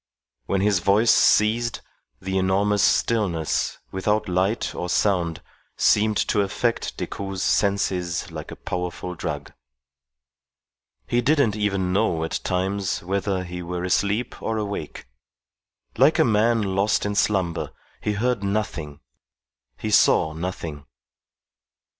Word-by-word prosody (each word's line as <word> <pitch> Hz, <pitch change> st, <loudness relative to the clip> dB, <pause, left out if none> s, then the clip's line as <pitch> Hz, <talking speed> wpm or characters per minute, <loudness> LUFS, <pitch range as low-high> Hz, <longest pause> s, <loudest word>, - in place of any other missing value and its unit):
When 95 Hz, -1 st, +1 dB
his 100 Hz, -2 st, +3 dB
voice 100 Hz, +6 st, +4 dB
ceased, 115 Hz, +2 st, +3 dB, 0.4 s
the 95 Hz, 0 st, -4 dB
enormous 100 Hz, +2 st, +2 dB
stillness, 100 Hz, -8 st, +1 dB
without 105 Hz, +3 st, 0 dB
light 95 Hz, +5 st, 0 dB
or 90 Hz, -, -4 dB
sound, 90 Hz, -5 st, +1 dB, 0.3 s
seemed 105 Hz, 0 st, +3 dB
to 105 Hz, -, +3 dB
affect 115 Hz, +4 st, -1 dB
Decoud's 95 Hz, -2 st, -4 dB
senses 90 Hz, -4 st, 0 dB
like -, -, -7 dB
a -, -, -7 dB
powerful 90 Hz, 0 st, -4 dB
drug. -, -, -5 dB, 1.5 s
He 120 Hz, -, +1 dB
didn't 140 Hz, -5 st, +2 dB
even 100 Hz, -3 st, 0 dB
know 90 Hz, -5 st, +1 dB
at 80 Hz, -, -2 dB
times 95 Hz, +1 st, -1 dB
whether 95 Hz, 0 st, -1 dB
he 90 Hz, 0 st, -6 dB
were 90 Hz, 0 st, -4 dB
asleep 105 Hz, +5 st, 0 dB
or 115 Hz, -, -2 dB
awake. 100 Hz, -7 st, -5 dB, 0.9 s
Like 135 Hz, +6 st, +4 dB
a -, -, +4 dB
man 115 Hz, 0 st, +2 dB
lost 100 Hz, +2 st, +1 dB
in 105 Hz, -, -1 dB
slumber, 95 Hz, -5 st, 0 dB, 0.3 s
he 105 Hz, -, -1 dB
heard 115 Hz, 0 st, 0 dB
nothing, 85 Hz, -8 st, -3 dB, 0.8 s
he -, -, -4 dB
saw 80 Hz, -, +4 dB
nothing. 80 Hz, -4 st, -5 dB
100 Hz, 120 wpm, -23 LUFS, 90-105 Hz, 1.5 s, voice